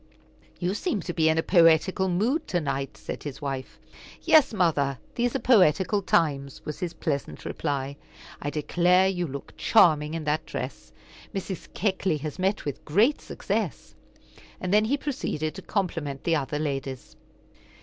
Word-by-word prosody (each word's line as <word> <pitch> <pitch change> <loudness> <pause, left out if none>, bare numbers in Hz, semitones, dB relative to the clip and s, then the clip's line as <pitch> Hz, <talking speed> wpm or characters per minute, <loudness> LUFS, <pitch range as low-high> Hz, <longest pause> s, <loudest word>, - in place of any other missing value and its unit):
"You 180 +1 -1
seem 215 - -1
to 175 - -4
be 160 -1 +3
in 160 - +2
a 160 - +2
poetical 175 +2 +4
mood 230 - 0
to 175 - 0
night," 140 -4 -3
said 105 - -6
his 145 -3 -6
wife. 135 -3 -5 0.5
"Yes, 310 -4 +6
mother, 155 - +1 0.2
these 245 0 0
are - - +1
poetical 200 - +4
times," 140 -7 +1
was 150 - -5
his 175 -3 -4
pleasant 145 -4 -3
reply. 140 -2 -3 0.4
"I 145 - -2
declare, 180 +5 +3
you 180 -2 -1
look 140 0 -8
charming 155 -7 +4
in 165 - -3
that 150 +1 -1
dress. - - -6 0.4
Mrs. 190 -1 -5
Keckley 190 -4 0
has 155 +4 -6
met 195 +3 0
with 145 -3 -4
great 215 - +3
success." - - -3 0.7
And 185 +1 -2
then 210 +1 +5
he 275 +6 +1
proceeded 245 - -3
to 195 - -8
compliment 165 -9 -3
the 165 - +2
other 145 0 -2
ladies. 135 -3 -4
165 Hz, 160 wpm, -26 LUFS, 145-190 Hz, 0.7 s, Yes